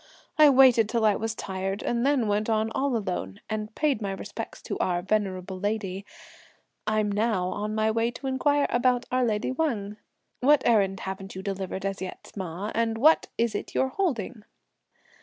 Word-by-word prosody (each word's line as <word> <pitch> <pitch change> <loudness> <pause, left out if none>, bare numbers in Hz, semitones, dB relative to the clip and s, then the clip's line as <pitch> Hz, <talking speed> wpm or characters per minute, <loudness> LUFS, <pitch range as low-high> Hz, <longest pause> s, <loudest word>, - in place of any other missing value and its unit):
I 305 -1 +9
waited 255 -5 +6
till 230 -1 +1
I 210 -2 +4
was 225 0 -3
tired, 195 0 -4
and 235 0 0
then 270 -4 +2
went 210 +2 0
on 220 0 +1
all 270 -1 0
alone, 180 - -4
and 215 0 -4
paid 290 -7 +1
my 200 -2 -2
respects 195 - -7
to - - -4
our 175 -1 0
venerable 190 -2 -1
lady; 200 -1 -3 0.8
I'm 215 -1 +1
now, 205 -3 0
on 210 +2 -3
my 220 0 +2
way 225 +1 +1
to 245 +3 -9
inquire 285 +2 +2
about 245 0 +2
our 255 0 +2
lady 220 +1 0
Wang. 230 -8 -2 0.4
What 290 +3 +4
errand 195 -4 +3
haven't 195 0 -6
you 190 - -6
delivered 190 -1 -4
as 195 0 -3
yet, 185 - -7
ma; 190 +1 -4
and 225 0 0
what 310 +7 +5
is 235 -1 +1
it - - -5
you're 265 - +2
holding?" 260 - -2
215 Hz, 175 wpm, -26 LUFS, 195-245 Hz, 0.8 s, I